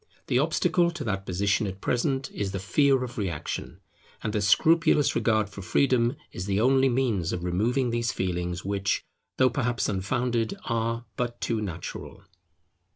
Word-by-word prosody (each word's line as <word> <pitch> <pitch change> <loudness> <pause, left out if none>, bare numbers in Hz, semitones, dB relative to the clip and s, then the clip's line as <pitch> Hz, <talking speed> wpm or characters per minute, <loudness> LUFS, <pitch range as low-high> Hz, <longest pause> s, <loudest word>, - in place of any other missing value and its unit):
The - - +2
obstacle 175 -1 +2
to 170 -3 -5
that 100 -3 -3
position 100 +3 +1
at 95 0 -6
present 130 +4 -1
is 100 -1 -3
the 95 - -2
fear 130 +8 +3
of 120 -1 -6
reaction; 85 -7 -4 0.4
and 110 0 -2
a 105 - +1
scrupulous 155 - +4
regard 110 -2 +2
for 100 0 -9
freedom 125 +4 +2 0.2
is 90 - -6
the 100 0 +1
only 135 +3 +4
means 120 -9 0
of 85 - -3
removing 115 +8 +1
these 115 -2 0
feelings 90 -1 -3
which, 100 0 0 0.3
though 130 -1 +4
perhaps 120 -1 0
unfounded, 115 +4 -1
are 115 +1 -1
but 120 -1 -2
too 115 -2 -1
natural. 85 -6 -6
115 Hz, 155 wpm, -27 LUFS, 95-125 Hz, 0.4 s, scrupulous